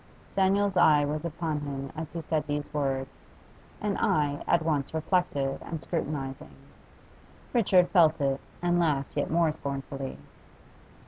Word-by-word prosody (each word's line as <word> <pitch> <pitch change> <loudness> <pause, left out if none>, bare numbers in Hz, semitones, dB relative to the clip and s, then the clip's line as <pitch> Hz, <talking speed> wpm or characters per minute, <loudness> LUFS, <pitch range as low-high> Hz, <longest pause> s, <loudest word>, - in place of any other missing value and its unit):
Daniel's 195 0 +2
eye 150 -3 +6
was 150 +2 -3
upon 160 -2 -2
him 140 -2 -5
as 160 0 -5
he 170 - -4
said 155 0 -1
these 145 0 -3
words, 135 -2 -1 0.7
an 205 -1 -1
eye 145 -2 +1
at 170 -1 +3
once 150 -2 0
reflective 160 -5 0
and 165 - -5
scrutinising. 145 -5 -4 1.0
Richard 190 -7 +4
felt 165 -4 +5
it, 135 -1 0 0.2
and 175 0 +3
laughed 145 -5 0
yet 145 - 0
more 165 -1 +2
scornfully. 135 -1 -5
155 Hz, 135 wpm, -28 LUFS, 140-170 Hz, 1.0 s, eye